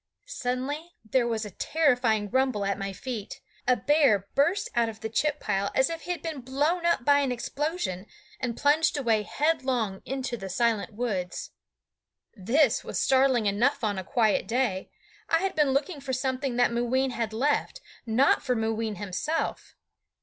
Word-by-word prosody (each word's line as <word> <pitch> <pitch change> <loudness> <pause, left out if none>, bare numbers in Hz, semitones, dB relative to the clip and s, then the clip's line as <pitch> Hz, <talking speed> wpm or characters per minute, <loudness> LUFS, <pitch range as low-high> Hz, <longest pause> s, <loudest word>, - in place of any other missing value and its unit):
Suddenly 285 - -3
there 235 +3 +2
was 225 -2 -1
a 210 - -7
terrifying 245 - +1
rumble 260 -5 +1
at 200 +1 -1
my 195 0 -3
feet. 225 0 -6 0.3
A 250 - +5
bear 245 -5 +3
burst 360 - +2
out 235 -1 +2
of 220 -1 -10
the 220 - -3
chip 295 +6 0
pile, 200 -1 -1
as 265 +5 +3
if 330 0 -5
he 360 - -4
had 345 -4 -4
been 320 -5 -4
blown 295 +7 0
up 340 -8 +1
by 285 0 +5
an 275 -2 0
explosion, 250 - -3 0.3
and 240 -3 -3
plunged 295 +2 +3
away 230 -6 +2
headlong 260 -6 0
into 265 -2 -3
the 195 -3 -7
silent 225 +2 0
woods. 195 -7 -3 0.8
This 235 +6 +2
was - - -3
startling 260 -3 +3
enough 230 +8 +1
on 205 -3 0
a - - -5
quiet 220 +1 +1
day. 225 -6 0 0.4
I 330 - +4
had 385 0 -1
been 300 -3 +3
looking 280 +3 -1
for 265 -1 -4
something 260 0 -1
that 245 0 +3
Mooween 250 +3 +1
had 230 -2 -2
left, 285 - 0 0.3
not 245 +5 +3
for 250 - 0
Mooween 225 -1 -1
himself. 205 - -3
250 Hz, 170 wpm, -27 LUFS, 220-285 Hz, 0.8 s, A